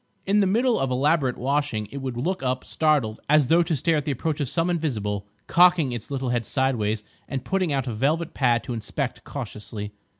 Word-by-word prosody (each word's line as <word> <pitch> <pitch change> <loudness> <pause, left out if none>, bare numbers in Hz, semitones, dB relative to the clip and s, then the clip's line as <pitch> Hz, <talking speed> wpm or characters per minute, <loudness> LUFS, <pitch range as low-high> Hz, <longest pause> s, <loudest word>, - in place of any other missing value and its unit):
In 200 +2 +3
the 200 - +4
middle 235 +4 +2
of 135 - 0
elaborate 135 0 +2
washing 135 -5 -1
it 140 - -6
would 130 -3 -4
look 180 +10 -1
up, 130 -1 -1
startled, 145 -9 +1
as 150 -3 +4
though 170 +1 +6
to 170 -1 0
stare 155 +4 +2
at 150 - -2
the 150 - 0
approach 150 +4 -2
of 140 -4 -1
some 165 +3 +1
Invisible, 110 - -2 0.2
cocking 175 -5 +5
its 120 -2 -6
little 135 -2 -2
head 120 -1 0
sideways 110 -5 0 0.2
and 135 -2 -4
putting 185 -4 0
out 135 -2 0
a 120 - -3
velvet 150 +9 0
pad 120 -3 +2
to 125 - -4
inspect 120 +4 -4
cautiously. 105 -5 -6
135 Hz, 205 wpm, -25 LUFS, 120-160 Hz, 0.2 s, though